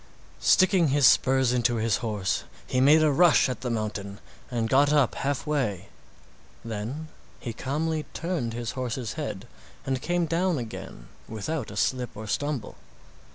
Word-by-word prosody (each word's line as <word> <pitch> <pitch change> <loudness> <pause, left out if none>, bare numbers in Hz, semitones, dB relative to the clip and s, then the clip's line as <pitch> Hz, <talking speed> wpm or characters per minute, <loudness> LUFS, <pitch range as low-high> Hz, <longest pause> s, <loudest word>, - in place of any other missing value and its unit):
Sticking 185 -3 +4
his 140 0 +3
spurs 130 -1 +4
into 120 -1 +2
his 110 -2 +1
horse 105 -5 -2 0.2
he 130 - 0
made 150 +4 +6
a 155 - +4
rush 165 -1 +5
at 130 - -4
the 125 - -3
mountain 105 -3 -3 0.3
and 115 -2 -1
got 140 +4 +4
up 145 -5 +3
halfway, 135 - -2 0.8
then 115 +8 -5 0.3
he 115 - -5
calmly 155 +6 -2
turned 165 -10 -2
his 120 -1 -4
horse's 125 -2 -4
head 130 -9 -5 0.4
and 130 -1 -1
came 175 +2 0
down 170 +1 +1
again 110 - -7 0.2
without 115 +5 -4
a 100 - -8
slip 125 -1 -1
or 110 - -6
stumble. 140 +1 -3
130 Hz, 150 wpm, -26 LUFS, 115-150 Hz, 0.8 s, made